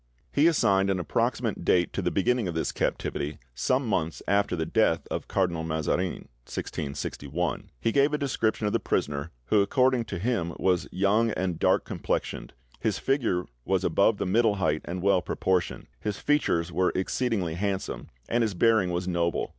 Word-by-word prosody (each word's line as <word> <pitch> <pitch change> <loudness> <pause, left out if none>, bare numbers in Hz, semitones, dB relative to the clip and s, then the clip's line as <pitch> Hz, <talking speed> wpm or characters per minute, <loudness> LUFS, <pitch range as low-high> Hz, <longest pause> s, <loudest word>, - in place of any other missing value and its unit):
He 145 +3 +4
assigned 100 -12 +3
an 95 -1 +1
approximate 90 - -1
date 90 -1 +2
to - - -1
the - - +1
beginning 115 +2 +1
of 85 - -4
this 80 - -1
captivity, 75 +1 -2 0.2
"some 130 - +1
months 85 -6 -1
after 100 -2 +2
the 80 -1 -1
death 80 -3 +2
of - - -3
Cardinal 90 -4 0
Mazarin" 80 +3 -1 0.2
(1661); 70 +2 -4
he 115 - +1
gave 140 +4 +3
a 150 - +1
description 120 -6 0
of 105 - 0
the - - +2
prisoner, 70 +2 -1 0.2
who 105 - +5
according 125 +2 +2
to 95 - -5
him 90 -4 -1
was 90 -2 +1
"young 100 +5 +2
and 90 -5 -2
dark - - +3
complexioned; - - -3 0.3
his 110 -4 0
figure 120 -10 0 0.2
was - - 0
above 110 - +3
the - - -2
middle 110 +2 +3
height 80 -6 0
and 90 +1 -4
well 100 -2 +4
proportioned; 90 0 -1
his 105 -2 -3
features 90 - +1
were 90 0 +2
exceedingly 95 -3 0
handsome, 95 +2 -3 0.2
and 120 - +1
his 110 -4 0
bearing 110 -1 +3
was 90 +1 -2
noble. 85 -1 0
95 Hz, 170 wpm, -27 LUFS, 85-115 Hz, 0.3 s, who